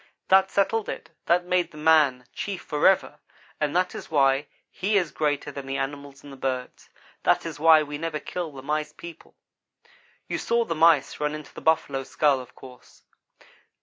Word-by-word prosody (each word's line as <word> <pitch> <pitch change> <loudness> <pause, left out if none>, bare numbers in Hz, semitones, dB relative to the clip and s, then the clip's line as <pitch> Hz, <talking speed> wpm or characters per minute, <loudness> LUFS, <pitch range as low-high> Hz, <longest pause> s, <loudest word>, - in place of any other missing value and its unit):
"That 190 0 +5
settled 205 +2 0
it. - - -7 0.2
That 175 +1 +3
made 180 0 +1
the 155 - -15
man 150 -5 +3
chief 200 -3 -5
forever, 150 -1 +2 0.4
and 150 0 -1
that 180 0 +1
is - - -8
why 140 -1 +2 0.2
he 205 +3 0
is 175 -6 0
greater 145 -1 -1
than 140 -1 -8
the 135 0 -2
animals 140 0 -5
and 145 -1 -11
the - - -11
birds. 130 -1 -4 0.3
That - - +2
is 160 -3 -6
why 160 0 +6
we 145 0 -6
never 160 -1 -3
kill 175 -1 -5
the 135 -2 -11
Mice 150 +1 -2
people. 170 +1 -12 0.9
"You - - -3
saw 235 0 +1
the 165 - -2
Mice 160 -3 +3
run 150 0 -1
into 155 -1 -10
the - - -10
buffalo 155 -4 +1
skull, 140 -1 +2
of 125 -1 -12
course. 125 -2 -15
150 Hz, 180 wpm, -25 LUFS, 140-170 Hz, 0.9 s, why